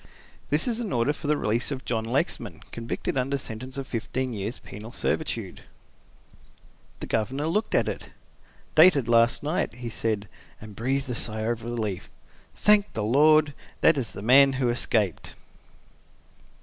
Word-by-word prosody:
"This 150 Hz, -, +2 dB
is 235 Hz, -1 st, -1 dB
an 225 Hz, -5 st, -3 dB
order 120 Hz, +5 st, +1 dB
for 150 Hz, -, -7 dB
the 150 Hz, 0 st, +2 dB
release 115 Hz, +1 st, -1 dB
of 135 Hz, -3 st, -5 dB
John 115 Hz, -2 st, -1 dB
Lexman, 120 Hz, +5 st, -2 dB
convicted 115 Hz, +3 st, -3 dB
under 135 Hz, +2 st, 0 dB
sentence 130 Hz, +1 st, -8 dB
of 135 Hz, -, -4 dB
fifteen 130 Hz, +1 st, -3 dB
years 105 Hz, +3 st, -4 dB
penal 110 Hz, +3 st, -10 dB
servitude." 115 Hz, -, -2 dB, 1.4 s
The -, -, -3 dB
Governor 130 Hz, +7 st, -1 dB
looked 205 Hz, +7 st, 0 dB
at -, -, +3 dB
it. -, -, -5 dB, 0.6 s
"Dated 155 Hz, -6 st, +6 dB
last 115 Hz, +2 st, +3 dB
night," 150 Hz, -5 st, -1 dB
he 120 Hz, -1 st, -6 dB
said, 110 Hz, -2 st, -2 dB, 0.3 s
and 105 Hz, -1 st, -11 dB
breathed 135 Hz, +5 st, -1 dB
a -, -, -4 dB
long -, -, -2 dB
sigh 110 Hz, -1 st, -1 dB
of 115 Hz, 0 st, -2 dB
relief. 110 Hz, -6 st, -4 dB, 0.5 s
"Thank 210 Hz, -1 st, +4 dB
the 110 Hz, -, -2 dB
Lord! 150 Hz, +5 st, +4 dB, 0.3 s
that 165 Hz, -, +6 dB
is 130 Hz, -5 st, -2 dB
the 100 Hz, -, -9 dB
man 135 Hz, +4 st, +6 dB
who 130 Hz, -2 st, 0 dB
escaped!" 110 Hz, -6 st, -1 dB
125 Hz, 160 wpm, -26 LUFS, 115-140 Hz, 1.4 s, Dated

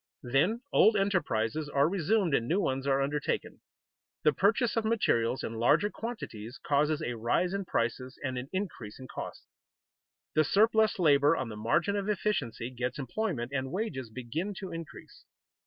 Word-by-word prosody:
Then 155 Hz, -, +1 dB
old 215 Hz, -1 st, +6 dB
enterprises 155 Hz, -, 0 dB
are 140 Hz, 0 st, +3 dB
resumed 190 Hz, 0 st, +1 dB
and 115 Hz, -3 st, +2 dB
new 180 Hz, +8 st, +2 dB
ones 135 Hz, -6 st, -1 dB
are 135 Hz, 0 st, +3 dB
undertaken. 145 Hz, +1 st, -2 dB, 0.6 s
The 150 Hz, -, +5 dB
purchase 220 Hz, -, +2 dB
of 225 Hz, -, +1 dB
materials 135 Hz, -, +1 dB
in 115 Hz, -, -3 dB
larger 205 Hz, -, +3 dB
quantities 130 Hz, -, -6 dB
causes 150 Hz, +1 st, +2 dB
a 120 Hz, -, -2 dB
rise 120 Hz, -, 0 dB
in 195 Hz, -1 st, -2 dB
prices 130 Hz, -1 st, -2 dB
and 130 Hz, -2 st, -2 dB
an 125 Hz, +2 st, -5 dB
increase 185 Hz, -, -4 dB
in 130 Hz, -, -9 dB
costs. -, -, -7 dB, 0.9 s
The 155 Hz, -, +4 dB
surplus 220 Hz, +6 st, +3 dB
labor 150 Hz, -2 st, +4 dB
on 130 Hz, -3 st, -3 dB
the 110 Hz, -, -6 dB
margin 135 Hz, -, +1 dB
of 200 Hz, 0 st, -2 dB
efficiency 135 Hz, -, -1 dB
gets 125 Hz, +1 st, -3 dB
employment, 140 Hz, -, -2 dB
and 130 Hz, -1 st, -2 dB
wages 160 Hz, -, -3 dB
begin 130 Hz, -, -4 dB
to 185 Hz, 0 st, -6 dB
increase. 165 Hz, -1 st, -9 dB
150 Hz, 160 wpm, -30 LUFS, 125-200 Hz, 0.9 s, old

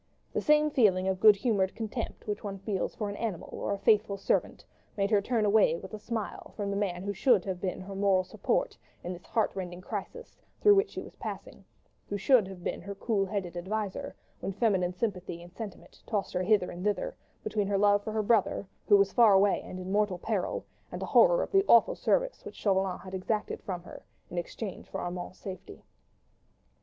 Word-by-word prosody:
The -, -, 0 dB
same 300 Hz, 0 st, +4 dB
feeling 190 Hz, -8 st, +3 dB
of 190 Hz, -1 st, 0 dB
good 215 Hz, 0 st, +8 dB
humoured 200 Hz, -4 st, 0 dB
contempt 225 Hz, +1 st, -5 dB
which 210 Hz, -1 st, -3 dB
one 200 Hz, -2 st, -4 dB
feels 195 Hz, 0 st, -3 dB
for 210 Hz, -, -3 dB
an 200 Hz, -, -4 dB
animal 215 Hz, -7 st, -4 dB
or -, -, -3 dB
a 200 Hz, -, 0 dB
faithful 205 Hz, 0 st, +3 dB
servant, -, -, -1 dB, 0.3 s
made 200 Hz, +1 st, +1 dB
her 205 Hz, -2 st, +4 dB
turn 225 Hz, 0 st, 0 dB
away 210 Hz, -3 st, +4 dB
with 190 Hz, +5 st, -9 dB
a 215 Hz, -, -5 dB
smile 225 Hz, -1 st, -5 dB
from 200 Hz, -2 st, -2 dB
the -, -, -2 dB
man 185 Hz, -3 st, -1 dB
who 200 Hz, +1 st, -2 dB
should 220 Hz, -2 st, +3 dB
have 185 Hz, -2 st, -4 dB
been 185 Hz, -2 st, -2 dB
her 195 Hz, +1 st, -8 dB
moral 195 Hz, -1 st, +3 dB
support 475 Hz, -, -1 dB, 0.3 s
in 180 Hz, -, -4 dB
this 175 Hz, -, -12 dB
heart 220 Hz, -, +1 dB
rending 180 Hz, -2 st, -5 dB
crisis 210 Hz, -, -7 dB, 0.2 s
through 415 Hz, -, +7 dB
which 400 Hz, +2 st, +3 dB
she -, -, -6 dB
was -, -, -13 dB
passing: -, -, -7 dB, 0.5 s
who 205 Hz, -, -1 dB
should 225 Hz, 0 st, +4 dB
have 190 Hz, -2 st, -10 dB
been -, -, -3 dB
her 200 Hz, +3 st, -7 dB
cool 195 Hz, -1 st, 0 dB
headed 190 Hz, -4 st, -3 dB
adviser, 195 Hz, +3 st, -3 dB, 0.2 s
when 195 Hz, -, -4 dB
feminine 185 Hz, -5 st, +1 dB
sympathy 180 Hz, -4 st, -3 dB
and 175 Hz, +1 st, -14 dB
sentiment 210 Hz, -3 st, -9 dB
tossed 205 Hz, -4 st, -2 dB
her 180 Hz, -, 0 dB
hither 200 Hz, -1 st, +2 dB
and 175 Hz, +1 st, -7 dB
thither, 210 Hz, -, -1 dB, 0.3 s
between 205 Hz, -2 st, -1 dB
her 200 Hz, 0 st, +1 dB
love 205 Hz, 0 st, +4 dB
for 215 Hz, -, -4 dB
her 215 Hz, 0 st, 0 dB
brother, 210 Hz, -2 st, +2 dB, 0.2 s
who 205 Hz, -, +7 dB
was 195 Hz, -1 st, +2 dB
far 230 Hz, -4 st, +6 dB
away 195 Hz, +1 st, +4 dB
and 185 Hz, -, -8 dB
in 185 Hz, +1 st, -5 dB
mortal 205 Hz, -2 st, +1 dB
peril, 195 Hz, 0 st, -2 dB, 0.3 s
and -, -, -5 dB
horror -, -, +5 dB
of -, -, -6 dB
the 390 Hz, 0 st, +5 dB
awful 235 Hz, -, +6 dB
service -, -, 0 dB
which -, -, -9 dB
Chauvelin 190 Hz, -2 st, +1 dB
had 185 Hz, +1 st, -10 dB
exacted 210 Hz, +3 st, -2 dB
from 180 Hz, -3 st, -5 dB
her, -, -, -11 dB, 0.3 s
in 175 Hz, -, -1 dB
exchange 190 Hz, +3 st, -6 dB
for -, -, -4 dB
Armand's 175 Hz, +1 st, -5 dB
safety. 190 Hz, -2 st, -9 dB
200 Hz, 210 wpm, -29 LUFS, 185-220 Hz, 0.5 s, good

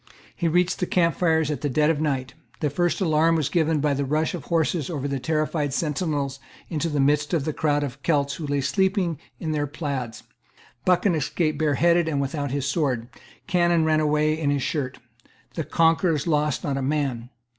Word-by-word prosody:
He 170 Hz, -, -1 dB
reached 180 Hz, +2 st, +2 dB
the 180 Hz, -, -1 dB
camp 170 Hz, -2 st, +2 dB
fires 160 Hz, -3 st, +2 dB
at 150 Hz, -, -3 dB
dead 150 Hz, +2 st, +2 dB
of 155 Hz, -2 st, -2 dB
night. 135 Hz, -4 st, -1 dB, 0.3 s
The 150 Hz, -3 st, 0 dB
first 175 Hz, +5 st, 0 dB
alarm 165 Hz, -1 st, +3 dB
was 150 Hz, -3 st, 0 dB
given 160 Hz, -1 st, +1 dB
by 145 Hz, 0 st, +1 dB
the 140 Hz, +1 st, -1 dB
rush 155 Hz, +3 st, 0 dB
of 175 Hz, -, -4 dB
the -, -, -18 dB
horses 165 Hz, -2 st, 0 dB
over 145 Hz, -5 st, -3 dB
the 140 Hz, -1 st, -2 dB
terrified 155 Hz, -1 st, -1 dB
sentinels 145 Hz, -3 st, -1 dB, 0.3 s
into 160 Hz, 0 st, -1 dB
the 150 Hz, -2 st, -1 dB
midst 145 Hz, +3 st, +2 dB
Of 145 Hz, -4 st, -1 dB
the 155 Hz, -, -1 dB
crowd 145 Hz, -1 st, +1 dB
of 140 Hz, 0 st, -6 dB
Celts 140 Hz, -3 st, +1 dB
who 155 Hz, -1 st, -5 dB
lay 145 Hz, 0 st, 0 dB
sleeping 190 Hz, 0 st, 0 dB, 0.2 s
in 160 Hz, -, -3 dB
their 145 Hz, -1 st, -1 dB
plaids. 140 Hz, -6 st, -4 dB, 0.6 s
Buchan 185 Hz, +1 st, +3 dB
escaped 155 Hz, 0 st, -1 dB
bareheaded 165 Hz, +3 st, +3 dB
and 150 Hz, -3 st, 0 dB
without 140 Hz, +1 st, -2 dB
his 140 Hz, +1 st, -2 dB
sword. 135 Hz, -6 st, -1 dB, 0.4 s
Cannon 175 Hz, -2 st, +2 dB
ran 155 Hz, -1 st, +3 dB
away 150 Hz, 0 st, +2 dB
in 150 Hz, -3 st, 0 dB
his 140 Hz, -2 st, 0 dB
shirt. 135 Hz, -5 st, -2 dB, 0.6 s
The 160 Hz, -, -2 dB
conquerors 165 Hz, 0 st, +2 dB
lost 150 Hz, -4 st, 0 dB
not 140 Hz, -1 st, -1 dB
a -, -, -2 dB
man. 135 Hz, -4 st, -1 dB
150 Hz, 195 wpm, -24 LUFS, 140-165 Hz, 0.6 s, alarm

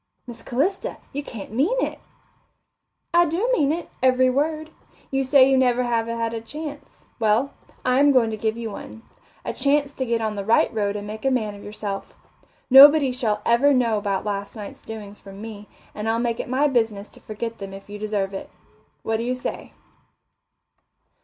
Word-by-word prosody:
"Miss 240 Hz, -2 st, -9 dB
Calista, 295 Hz, +11 st, -1 dB, 0.2 s
you 285 Hz, -, -2 dB
can't 225 Hz, -9 st, -9 dB
mean 300 Hz, -, +1 dB
it." -, -, -2 dB, 1.1 s
"I 345 Hz, 0 st, +5 dB
do 375 Hz, +11 st, 0 dB
mean 290 Hz, -, +2 dB
it, 335 Hz, +1 st, -3 dB
every 255 Hz, 0 st, +4 dB
word. 310 Hz, +3 st, -1 dB, 0.4 s
You 270 Hz, 0 st, +1 dB
say 265 Hz, 0 st, +6 dB
you 270 Hz, -, +2 dB
have 245 Hz, -2 st, +3 dB
never 250 Hz, -, +1 dB
had 230 Hz, -1 st, -1 dB
a 225 Hz, -, -4 dB
chance. 295 Hz, +5 st, -9 dB
Well, 225 Hz, +5 st, +2 dB, 0.3 s
I 255 Hz, +1 st, +3 dB
am 285 Hz, 0 st, +6 dB
going 240 Hz, -4 st, +3 dB
to -, -, -2 dB
give 220 Hz, +1 st, -2 dB
you 230 Hz, -2 st, -5 dB
one 225 Hz, +2 st, -9 dB, 0.4 s
a -, -, -2 dB
chance 285 Hz, 0 st, +1 dB
to 260 Hz, -, -3 dB
get 230 Hz, 0 st, +1 dB
on 220 Hz, -1 st, -2 dB
the 200 Hz, -, -3 dB
right 225 Hz, +3 st, +3 dB
road 205 Hz, -2 st, -1 dB
and 205 Hz, 0 st, -5 dB
make 215 Hz, +1 st, -7 dB
a 270 Hz, -, +3 dB
man 220 Hz, -5 st, 0 dB
of 200 Hz, -, -12 dB
yourself. 205 Hz, -1 st, -6 dB, 0.5 s
Nobody 280 Hz, +1 st, +8 dB
shall 240 Hz, -4 st, -1 dB
ever 270 Hz, +5 st, +4 dB
know 230 Hz, -4 st, +2 dB
about 200 Hz, -1 st, -2 dB
last 200 Hz, 0 st, -4 dB
night's 210 Hz, -2 st, -9 dB
doings 210 Hz, -2 st, -9 dB
from 195 Hz, 0 st, -11 dB
me, 210 Hz, -1 st, -9 dB, 0.2 s
and 215 Hz, +1 st, -3 dB
I'll 225 Hz, -, +1 dB
make 235 Hz, -1 st, -1 dB
it -, -, -4 dB
my 270 Hz, +4 st, +2 dB
business 225 Hz, -6 st, 0 dB
to -, -, -16 dB
forget 225 Hz, +2 st, -6 dB
them 195 Hz, -1 st, -7 dB
if 195 Hz, 0 st, -11 dB
you 205 Hz, 0 st, -8 dB
deserve 205 Hz, -2 st, -2 dB
it. 195 Hz, -, -6 dB, 0.5 s
What 225 Hz, 0 st, 0 dB
do 230 Hz, -, -3 dB
you 250 Hz, +1 st, -1 dB
say?" 250 Hz, -, -6 dB
230 Hz, 195 wpm, -23 LUFS, 215-270 Hz, 1.1 s, Nobody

